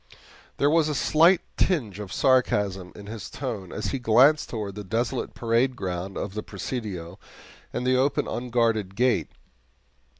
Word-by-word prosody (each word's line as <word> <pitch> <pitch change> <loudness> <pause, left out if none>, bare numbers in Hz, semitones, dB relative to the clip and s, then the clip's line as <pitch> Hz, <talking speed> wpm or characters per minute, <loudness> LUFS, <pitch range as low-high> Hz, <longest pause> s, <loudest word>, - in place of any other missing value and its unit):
There 145 +1 +3
was 160 -1 +3
a 150 - -1
slight 165 +6 +4 0.2
tinge 115 - 0
of 100 -3 -7
sarcasm 105 -8 +1
in 100 - -10
his 105 -1 -7
tone 110 -10 -5
as 105 - -3
he 135 - -2
glanced 125 +6 +4
toward 105 -4 -4
the 105 +1 -7
desolate 115 +6 -2
parade 120 +3 +1
ground 95 -2 -4
of 100 - -4
the 110 - -3
Presidio 100 -5 -6 0.5
and 125 - -3
the 130 0 +3
open 135 +3 +1
unguarded 115 -5 0
gate. 125 +3 +2
115 Hz, 155 wpm, -25 LUFS, 100-130 Hz, 0.5 s, slight